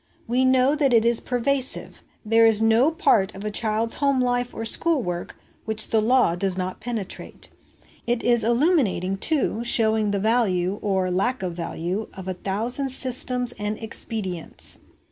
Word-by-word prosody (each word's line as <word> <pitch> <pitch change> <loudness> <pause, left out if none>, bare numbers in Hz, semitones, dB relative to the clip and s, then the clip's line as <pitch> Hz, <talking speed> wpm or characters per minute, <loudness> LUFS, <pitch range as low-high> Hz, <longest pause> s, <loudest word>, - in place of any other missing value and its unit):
We 250 +3 +1
know 260 +1 +3
that 280 -4 +1
it 225 0 +3
is 235 -1 +4
pervasive; 260 +2 0 0.2
there 225 +1 +4
is 220 -2 +4
no 225 +5 +3
part 225 - +1
of 195 +2 -8
a 210 - -2
child's 220 +1 0
home 280 -2 0
life 245 0 0
or 225 - -6
school 310 +4 +1
work 175 -2 -5 0.3
which 220 0 0
the 220 - +2
law 245 -6 +2
does 185 +1 -1
not 185 0 -4
penetrate. 225 -6 -6 0.6
It 240 0 0
is 240 -2 +3
illuminating, 235 - +1
too, 265 -2 -1
showing 220 -2 +2
the 200 - -1
value, 200 -4 0
or 190 -2 -1
lack 240 +6 -1
of 180 -2 -3
value, 175 +4 -4
of 190 -1 -9
a 185 - -2
thousand 225 +9 -2
systems 250 -1 +1
and 210 +1 -3
expedients. 210 -6 -1
225 Hz, 165 wpm, -23 LUFS, 195-250 Hz, 0.6 s, is